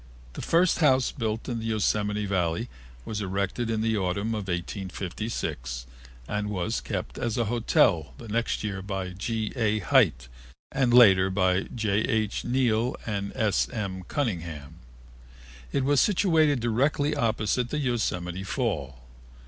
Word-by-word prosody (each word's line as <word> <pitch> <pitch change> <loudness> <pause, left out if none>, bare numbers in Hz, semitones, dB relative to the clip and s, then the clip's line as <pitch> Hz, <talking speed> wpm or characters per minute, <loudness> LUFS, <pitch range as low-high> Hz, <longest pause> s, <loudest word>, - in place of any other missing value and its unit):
The - - -6
first 175 +2 +3
house 135 -5 +4
built 115 -4 -3
in 120 -3 -2
the 115 - -5
Yosemite 105 -1 0
Valley 95 +3 -1 0.4
was 105 -1 -3
erected 100 +4 -2
in 110 -1 0
the 110 -1 +1
autumn 100 +3 -1
of 105 -3 -3
1856 90 - -4 0.4
and 105 0 -2
was 105 +3 -2
kept - - -4
as 120 +1 -1
a 120 - +1
hotel 105 -7 +2
the 115 - -10
next 115 +2 -1
year 100 -3 -3
by 95 -1 -4
G. 110 +4 -3
A. 110 -4 +1
Hite 60 - +3 0.4
and 135 -3 +2
later 95 -6 +7
by 95 -1 +2
J. 105 -4 0
H. 110 -2 0
Neal 120 -1 +1
and 100 -2 -3
S. 110 -6 +1
M. 95 -4 -4
Cunningham. 80 - -3 0.9
It 140 - 0
was 140 -2 +4
situated 160 -8 +3
directly 140 +6 +1
opposite 115 -1 0
the 150 - -2
Yosemite 95 - -1
Fall. 75 - -3
110 Hz, 140 wpm, -27 LUFS, 95-120 Hz, 0.9 s, later